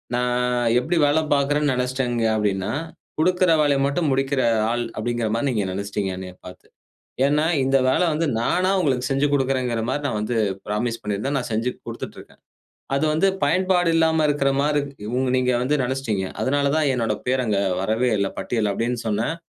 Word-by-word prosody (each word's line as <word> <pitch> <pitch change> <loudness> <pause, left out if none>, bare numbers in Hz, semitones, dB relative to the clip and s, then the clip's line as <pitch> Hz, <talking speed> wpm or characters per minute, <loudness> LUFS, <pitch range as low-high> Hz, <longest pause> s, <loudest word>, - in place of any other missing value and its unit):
நான் 125 0 0 0.4
எப்டி 170 +6 -1
வேலை 145 +2 +3
பாக்கறேன்னு 145 +1 +1
நெனச்சுட்டீங்க 125 -2 -1
அப்படின்னா, 100 -1 -1 0.5
"கொடுக்கிற 180 +1 +3
வேலைய 140 -2 +2
மட்டும் 150 +1 0
முடிக்கிற 135 0 0 0.3
ஆள்" 120 0 -1
அப்படிங்கிற 120 0 -1
மாரி 120 +5 0
நீங்க 105 -5 -1
நெனச்சுட்டீங்க, 100 0 -3
என்னையப் 90 -1 -9
பாத்து. 90 - -13 0.6
ஏன்னா, 150 +2 +2 0.2
இந்த 135 +1 +3
வேல - - +2
வந்து 165 +2 0
நானா 180 +9 +1
உங்களுக்கு 130 -7 0
செஞ்சு 135 +2 +2
கொடுக்கிறேன்ங்கிற 130 -4 0
மாரி 145 +2 -2
நான் 110 - -2
வந்து 110 +3 -2 0.3
புராமிஸ் 115 +3 -2
பண்ணியிருந்தேன். 105 +7 -2
நான் 125 - -6
செஞ்சு 115 +3 0 0.2
குடுத்துட்டு - - -7
இருக்கேன். - - -18 0.6
அது 140 +3 +1
வந்து 160 +5 +3 0.2
பயன்பாடு 185 -2 +2
இல்லாம 160 -1 +3
இருக்கற 145 -2 +1
மாரி 150 +1 +2 0.4
உங் 130 0 0
நீங்க 125 0 +2
வந்து 135 +4 +1
நெனச்சுட்டீங்க. 125 -6 -2 0.2
அதனால 140 +1 +1
தான் 155 -2 +2
என்னோட 115 -3 0
பேர் 130 0 +1
அங்க 105 -3 +1 0.2
வரவேயில்ல 110 -1 +1
பட்டியல்ல 110 -4 -1
அப்படின்னு 120 +3 -2
சொன்னேன். 110 +8 0
125 Hz, 165 wpm, -22 LUFS, 115-145 Hz, 0.6 s, வேலை